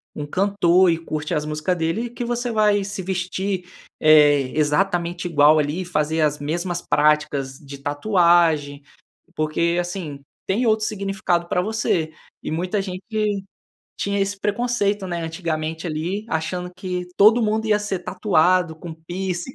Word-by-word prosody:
um 145 -1 -5
cantor 185 -1 +3
e 165 - 0
curte 155 -2 -4
as 150 - 0
músicas 155 +4 -1
dele, 170 +8 -1
que 240 +1 -6
você 240 0 -2
vai 210 -2 +3
se 200 0 -5
vestir, 185 0 -3 0.3
eh, 145 -4 +5
exatamente 175 +3 0
igual 150 -1 +5
ali 150 +4 0
e - - -5
fazer 160 -2 0
as 150 -1 +2
mesmas 170 +4 -3
práticas 145 -3 +1
de 140 -1 -11
tatuagem, 155 -2 +2 0.5
porque, 170 +3 0
assim, 175 -5 -4 0.3
tem 225 +6 +1
outro 215 -1 +2
significado 195 -4 -1
pra 180 - +1
você. 185 -6 -1 0.3
E - - -5
muita 180 +5 -1
gente 200 +2 -3 0.6
tinha 200 0 -1
esse 195 +1 -1
preconceito, 205 -1 0
né, 175 -2 -3
antigamente 160 -1 -3
ali 175 +6 -3
achando 180 +2 -3
que 180 -1 -4
todo 220 +4 +6
mundo 220 +1 0
ia 210 -1 +2
ser 200 -3 -2
tatuado, 180 -2 +2
com 160 0 -8
piercing. 175 +4 -4
175 Hz, 145 wpm, -22 LUFS, 155-200 Hz, 0.6 s, todo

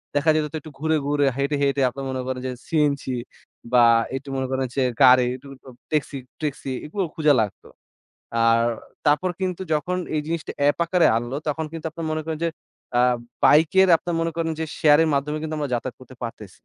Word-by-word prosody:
দেখা 145 +2 +2
যেত 155 -1 +1
তো - - -4
একটু 155 - -11
ঘুরে, 160 +1 +1
ঘুরে 145 -1 +2
হেঁটে, 140 +2 0
হেঁটে 140 0 +1
আপনারা 135 +2 -7
মনে 130 -1 -3
করেন 130 -1 -3
যে, - - -2 0.2
সিএনজি 145 -4 0 0.6
বা 120 -1 +7 0.3
একটু 135 +1 -6
মনে 130 -1 -1
করেন 130 -1 0
যে, 135 - +2 0.2
গাড়ি 125 -1 +7
একটু 135 +2 -13 0.4
ট্যাক্সি, 145 -2 -1 0.2
ট্যাক্সি 140 -3 -3
এগুলো 190 +6 -2
খুঁজা 155 -3 +4
লাগতো। 105 - -5 0.8
আর 115 0 +4 0.5
তারপর 150 +5 +3
কিন্তু 185 0 -2
যখন 180 +4 -1 0.2
এই 150 - +1
জিনিসটা 165 -1 -3
এ্যাপ 145 +3 +3
আকারে 175 +1 +3
আনলো, 120 +4 -3
তখন 160 +2 -1
কিন্তু 165 -1 -6
আপনারা 165 0 -6
মনে 155 0 -2
করেন 160 -1 -3
যে, - - +2 0.5
আ - - +5 0.4
বাইক 150 +1 +6
এর 190 - +4
আপনার 175 +1 -4
মনে 165 0 -1
করেন 165 -1 -1
যে, - - 0
শেয়ার 150 -1 +6
এর 160 - +2
মাধ্যমে 150 +2 -1
কিন্তু 160 0 -3
আমরা 145 -4 -3
যাতায়াত 125 +2 -4
করতে 130 0 -14
পারতেছি। 110 -4 -6
145 Hz, 200 wpm, -23 LUFS, 130-160 Hz, 0.8 s, বা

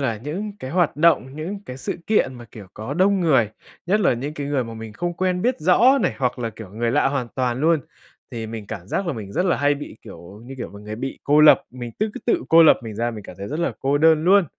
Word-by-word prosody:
là 120 -5 -1
những 170 - -5
cái 130 - -7
hoạt 175 -3 +1
động, 150 -4 +2
những 175 +7 -5
cái 125 - -7
sự 135 - -4
kiện 210 -11 +2
mà, 120 -1 -10
kiểu, 105 -3 -11
có 110 +6 -5
đông 190 +3 +3
người, 135 - +3 0.4
nhất 205 +4 +2
là - - +3
những 140 +6 -5
cái 145 -2 -4
người 140 -3 0
mà 115 0 -8
mình 110 -1 -8
không 175 +9 -3
quen 180 0 -1
biết 250 -6 0
rõ 235 - +5
này, - - 0
hoặc 125 -2 -1
là, 115 -2 -3
kiểu, 110 -2 -11
người 115 +4 -2
lạ 135 +2 +2
hoàn 135 -4 -2
toàn 125 -1 -1
luôn, 160 0 +3 0.5
thì 115 -1 -5
mình 110 -2 -7
cảm 100 -4 -7
giác 195 - -2
là 170 - -1
mình 105 -6 -7
rất 180 - 0
là 180 - +2
hay 145 0 +2
bị, 145 - -9
kiểu 95 0 -12
như 135 +2 -9
kiểu, 120 - -5
mà 100 - -12
người 105 +1 -7
bị 135 +3 -5
cô 150 +1 +4
lập, 150 - +7
mình 120 -1 -7
tứ 215 - +1
cứ - - -7
tự 240 - +2
cô 165 +1 +7
lập 160 - +7
mình 110 -2 -7
ra 120 +3 -1
mình 105 -3 -9
cảm 90 - -11
thấy 100 - -6
rất 150 - -4
là 170 - 0
cô 140 +2 +1
đơn 160 0 +4
luôn. 195 +1 +5
135 Hz, 280 wpm, -22 LUFS, 115-170 Hz, 0.5 s, lập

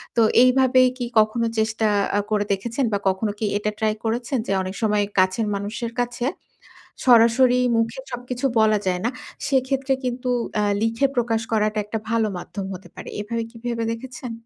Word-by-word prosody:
তো 235 - +4 0.2
এইভাবে 255 0 +5 0.2
কি 245 - -2
কখনো 220 +2 +2
চেষ্টা 220 0 +1 0.3
আ - - +3
করে 205 -1 +1
দেখেছেন? 235 +7 -2
বা - - +3
কখনো 200 +3 -1
কি 220 - -1
এটা 210 +1 -1
ট্রাই 215 -1 +1
করেছেন? 240 +4 -1
যে, - - -1
অনেক 185 +1 -5
সময় 210 -1 +2 0.2
কাছের 185 +4 +2
মানুষের 220 +4 -4
কাছে 245 0 -2 0.8
সরাসরি 245 +1 +5 0.2
মুখে 230 +3 -1
সবকিছু 245 +1 -4
বলা 215 -1 +4
যায় 180 -1 0
না। - - +3 0.4
সেক্ষেত্রে 270 0 +1
কিন্তু 250 0 -2 0.3
আ - - +1 0.2
লিখে 230 +5 +1
প্রকাশ 230 -2 +1
করাটা 215 -1 +1
একটা 215 +2 -3
ভালো 230 -1 +2
মাধ্যম 195 +2 -6
হতে 185 +2 -10
পারে। - - -8
এভাবে 230 +2 -3
কি 230 - -14
ভেবে 235 -1 -1
দেখেছেন? 250 +1 -7
230 Hz, 170 wpm, -23 LUFS, 215-245 Hz, 0.8 s, এইভাবে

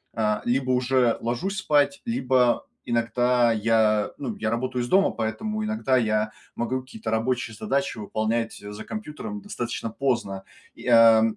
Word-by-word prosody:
а, 105 -1 +1
либо 130 +1 +1
уже 125 -1 +2
ложусь 125 - -2
спать, 150 +6 +2
либо 130 - +2 0.2
иногда 120 +1 +2
я, 110 -1 +2
ну, 125 -6 -4
я 110 - -1
работаю 125 +1 -1
из 120 - -4
дома, 195 +1 +4
поэтому 215 - -3
иногда 215 -12 +1
я 110 -2 +1 0.2
могу 130 +2 -1
какие-то 110 -4 -7
рабочие 115 0 -1
задачи 140 +3 -1
выполнять 110 +2 -1
за 105 +1 -8
компьютером 210 +1 -6
достаточно 120 - -4
поздно. 115 -7 -1 0.3
И, - - -10
а, 115 -2 +7
120 Hz, 145 wpm, -25 LUFS, 110-135 Hz, 0.3 s, а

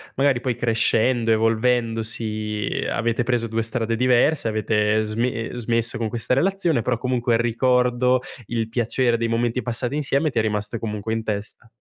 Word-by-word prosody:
magari 135 -2 +2
poi 125 -1 -2
crescendo, 115 0 +2
evolvendosi 110 -2 0
avete 115 +1 0
preso 120 -1 0
2 115 0 -1
strade 115 0 -1
diverse, 125 +3 +3
avete 110 0 +1
sme 115 +2 -2
smesso 115 0 0
con 115 -1 -2
questa 115 +2 -2
relazione, 170 -2 +1
però 120 +1 0
comunque 125 -1 0
il 115 - +3
ricordo, 125 +1 +2 0.2
il 115 0 -2
piacere 120 +1 +1
dei 115 0 -1
momenti 115 +2 0
passati 120 +2 -2
insieme 145 +1 +1
ti - - -1
è - - +4
rimasto 105 +1 -1
comunque 105 0 -4
in 115 0 -1
testa. 105 +2 -5
115 Hz, 155 wpm, -22 LUFS, 110-125 Hz, 0.2 s, è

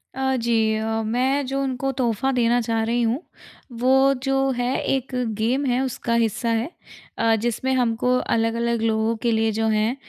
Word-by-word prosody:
अ, 265 0 0
जी, 225 -2 +1
अ, 220 +1 -1
मैं 260 +5 0
जो 275 +1 -2
उनको 270 0 -2
तोहफ़ा 250 +1 0
देना 240 0 +2
चाह 225 0 -1
रही 235 +2 0
हूँ, 235 +7 0 0.5
वो 265 +3 +3
जो 270 0 +1
है 245 +2 0
एक 265 0 -1 0.3
गेम 250 +6 0
है 250 0 +1
उसका 250 -2 -2
हिस्सा 225 +2 -1
है। 230 +5 0 0.5
अ, 225 0 +3
जिसमें 240 +3 -1
हमको 250 0 +1 0.2
अलग-अलग 230 0 0
लोगों 220 0 +1
के 235 - +3
लिए 220 0 +1
जो 220 +1 -1
है 220 +3 +1
235 Hz, 175 wpm, -23 LUFS, 225-265 Hz, 0.5 s, वो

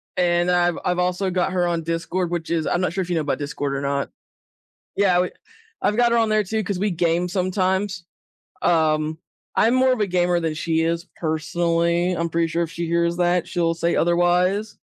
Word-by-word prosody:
and 175 0 +2
I've 175 -1 +2
I've 180 0 0
also 180 +2 0
got 180 +1 0
her 180 -1 +1
on 170 -1 -1
Discord, 165 +2 -2
which 170 -2 -3
is 160 -2 0
I'm 175 - 0
not 180 -3 -1
sure 190 - -1
if 180 - -5
you 175 - 0
know 160 - +1
about 145 - -1
Discord 145 -1 -3
or 140 - -3
not. 140 0 -2 0.9
Yeah, 185 -3 +3
we 180 - 0 0.5
I've 210 - +1
got 240 -1 +4
her 235 - +3
on 225 -1 +2
there 215 0 +3
too 215 +2 -2
'cause 190 -1 -3
we 205 0 +1
game 175 +1 0
sometimes. 185 0 -1 0.6
Um, 155 -2 +1 0.4
I'm 230 - +4
more 260 0 +4
of 250 - -1
a 210 - +2
gamer 175 -1 +1
than 160 -2 -2
she 160 0 0
is 170 +2 -1
personally, 170 +2 0
I'm 170 0 -1
pretty 165 0 +1
sure 170 +1 0
if 165 - -8
she 170 0 -3
hears 170 +1 +1
that, 175 -1 +2
she'll 170 -2 0
say 170 +1 0
otherwise. 180 +5 +1
175 Hz, 210 wpm, -22 LUFS, 165-185 Hz, 0.9 s, got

